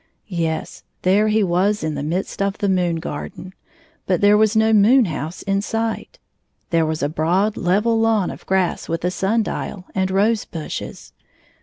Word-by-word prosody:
Yes; 165 Hz, -4 st, -3 dB, 0.2 s
there 200 Hz, +4 st, +3 dB
he 215 Hz, 0 st, +2 dB
was 190 Hz, +3 st, +1 dB
in 155 Hz, -1 st, -1 dB
the 140 Hz, -, -4 dB
midst 170 Hz, +7 st, -3 dB
of 200 Hz, 0 st, 0 dB
the 200 Hz, -, -1 dB
moon 180 Hz, -3 st, +1 dB
75 -, -, -6 dB
garden, 75 Hz, -, -7 dB, 0.5 s
but 180 Hz, -2 st, +2 dB
there 205 Hz, +1 st, +5 dB
was 215 Hz, +1 st, +3 dB
no 220 Hz, 0 st, +4 dB
moon 225 Hz, +5 st, +5 dB
house 160 Hz, 0 st, -5 dB
m 195 Hz, 0 st, +1 dB
sight. 225 Hz, -, -3 dB, 0.5 s
There 165 Hz, -2 st, +2 dB
was 155 Hz, -2 st, -2 dB
a -, -, +2 dB
broad 175 Hz, +7 st, +1 dB
level 210 Hz, +6 st, +1 dB
lawn 225 Hz, -4 st, +2 dB
of -, -, -11 dB
grass 190 Hz, -2 st, 0 dB
with 165 Hz, +1 st, -2 dB
a 180 Hz, -, +1 dB
sun 210 Hz, +5 st, +1 dB
dial 185 Hz, -2 st, -5 dB
and 190 Hz, 0 st, 0 dB
rose 205 Hz, +3 st, +2 dB
bushes. 160 Hz, -3 st, -7 dB
190 Hz, 180 wpm, -21 LUFS, 170-210 Hz, 0.5 s, there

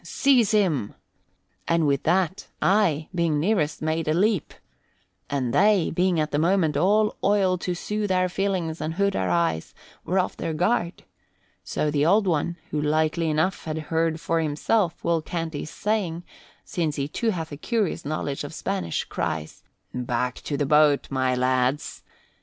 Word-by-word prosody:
Seize 255 Hz, -7 st, +3 dB
him!' 180 Hz, -, +1 dB, 0.7 s
And 165 Hz, -1 st, +2 dB
with 140 Hz, -1 st, +1 dB
that 185 Hz, +3 st, +1 dB
I, 180 Hz, -7 st, +2 dB
being 170 Hz, -4 st, +1 dB
nearest, 160 Hz, -4 st, 0 dB
made 160 Hz, 0 st, -1 dB
a 155 Hz, -, +2 dB
leap. 200 Hz, -1 st, +1 dB, 0.8 s
And 130 Hz, -4 st, -1 dB
they, 205 Hz, -3 st, +4 dB
being 180 Hz, 0 st, +2 dB
at 155 Hz, 0 st, -1 dB
the 145 Hz, -, +1 dB
moment 165 Hz, -2 st, +2 dB
all 210 Hz, +7 st, +3 dB
oil 195 Hz, -2 st, +3 dB
to 180 Hz, 0 st, -2 dB
soothe 210 Hz, +2 st, -2 dB
our 185 Hz, 0 st, +2 dB
feelings 180 Hz, -4 st, -2 dB
and 155 Hz, +1 st, -3 dB
hood 200 Hz, +1 st, +1 dB
our 95 Hz, -1 st, 0 dB
eyes, 85 Hz, -2 st, 0 dB, 0.3 s
were 185 Hz, -, -1 dB
off 185 Hz, -, 0 dB
their 160 Hz, -, -3 dB
guard. 175 Hz, 0 st, 0 dB, 0.6 s
So 150 Hz, -, -1 dB
the 145 Hz, -1 st, +1 dB
Old 200 Hz, +6 st, +4 dB
One, 170 Hz, 0 st, 0 dB
who 150 Hz, -, -1 dB
likely 155 Hz, +2 st, +1 dB
enough 160 Hz, +5 st, 0 dB
had 155 Hz, -1 st, -3 dB, 0.2 s
heard 165 Hz, 0 st, +1 dB
for 165 Hz, 0 st, 0 dB
himself 165 Hz, +5 st, 0 dB
Will 170 Hz, -1 st, +1 dB
Canty's 160 Hz, -2 st, -4 dB
saying, 190 Hz, -6 st, -2 dB, 0.4 s
since 160 Hz, -4 st, -2 dB
he 140 Hz, -1 st, -2 dB
too 230 Hz, +9 st, -1 dB
hath 165 Hz, -6 st, -3 dB
a -, -, -5 dB
curious 205 Hz, -, -1 dB
knowledge 145 Hz, -1 st, -3 dB
of 145 Hz, +2 st, -7 dB
Spanish, 195 Hz, -, -2 dB
cries, 80 Hz, 0 st, -4 dB, 0.3 s
'Back 125 Hz, 0 st, -1 dB
to 145 Hz, -, -2 dB
the 145 Hz, -, 0 dB
boat, 150 Hz, 0 st, +3 dB
my 130 Hz, -1 st, +1 dB
lads!' 130 Hz, +2 st, 0 dB
165 Hz, 165 wpm, -25 LUFS, 150-190 Hz, 0.8 s, they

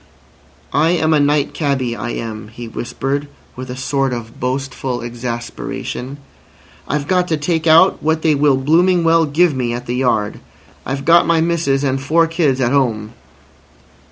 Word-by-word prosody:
"I 150 Hz, +4 st, +3 dB
am 160 Hz, -2 st, +2 dB
a 150 Hz, -, +4 dB
night 145 Hz, 0 st, +1 dB
cabby, 135 Hz, -6 st, -1 dB
I 120 Hz, -, -5 dB
am," 110 Hz, -3 st, -5 dB
he 115 Hz, +2 st, -9 dB
whispered, 135 Hz, +5 st, -3 dB, 0.3 s
with 130 Hz, +1 st, -8 dB
a 125 Hz, -, -6 dB
sort 135 Hz, 0 st, -1 dB
of 115 Hz, -2 st, -7 dB
boastful 130 Hz, 0 st, -3 dB
exasperation. 120 Hz, +2 st, -5 dB, 0.7 s
"I've 145 Hz, -1 st, -2 dB
got 180 Hz, 0 st, +1 dB
to 160 Hz, -, 0 dB
take 160 Hz, +2 st, -1 dB
out 165 Hz, +4 st, +5 dB
what 160 Hz, +1 st, 0 dB
they 160 Hz, -, +4 dB
will 145 Hz, -2 st, +3 dB
blooming 170 Hz, +6 st, +3 dB
well 165 Hz, 0 st, +4 dB
give 160 Hz, +3 st, +2 dB
me 120 Hz, -2 st, -1 dB
at 120 Hz, +1 st, -5 dB
the 120 Hz, -, -3 dB
yard. 110 Hz, -5 st, 0 dB, 0.5 s
I've 135 Hz, +1 st, -3 dB
got 170 Hz, +2 st, +5 dB
my 165 Hz, -1 st, +3 dB
missus 160 Hz, -4 st, 0 dB
and 135 Hz, -1 st, 0 dB
four 165 Hz, +4 st, +3 dB
kids 160 Hz, -5 st, 0 dB
at 125 Hz, -2 st, +1 dB
'ome." 115 Hz, -5 st, 0 dB
140 Hz, 165 wpm, -17 LUFS, 125-160 Hz, 0.7 s, out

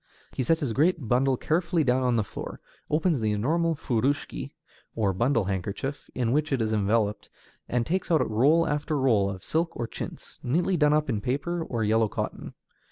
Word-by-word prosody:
He -, -, -3 dB
sets 160 Hz, +6 st, +2 dB
his 130 Hz, -6 st, -1 dB
great 155 Hz, 0 st, +2 dB
bundle 130 Hz, +3 st, +2 dB
carefully 170 Hz, +2 st, +1 dB
down 130 Hz, -1 st, +2 dB
on 125 Hz, -2 st, +2 dB
the 110 Hz, -, +2 dB
floor, -, -, -7 dB, 0.3 s
opens 155 Hz, -1 st, +2 dB
the 110 Hz, -1 st, 0 dB
enormous 160 Hz, +9 st, +1 dB
furushiki, 135 Hz, -1 st, -1 dB, 0.4 s
or 105 Hz, -4 st, +1 dB
bundle 115 Hz, +4 st, +2 dB
handkerchief, 100 Hz, +9 st, -4 dB
in 120 Hz, -2 st, 0 dB
which 150 Hz, +3 st, +1 dB
it 135 Hz, -, +1 dB
is 110 Hz, -1 st, 0 dB
enveloped, 105 Hz, 0 st, 0 dB, 0.4 s
and 120 Hz, -1 st, 0 dB
takes 185 Hz, +7 st, -1 dB
out 160 Hz, -3 st, +3 dB
roll 145 Hz, +10 st, +3 dB
after 150 Hz, +1 st, -1 dB
roll 115 Hz, -8 st, +3 dB
of 95 Hz, -1 st, -7 dB
silk 165 Hz, +2 st, -1 dB
or 120 Hz, -, -2 dB
chintz, -, -, -8 dB
neatly 175 Hz, +9 st, +1 dB
done 150 Hz, -3 st, +4 dB
up 150 Hz, 0 st, +2 dB
in 105 Hz, -, -1 dB
paper 145 Hz, +9 st, -2 dB
or 120 Hz, -7 st, -2 dB
yellow 110 Hz, +1 st, +3 dB
cotton. -, -, -5 dB
130 Hz, 185 wpm, -27 LUFS, 110-155 Hz, 0.4 s, done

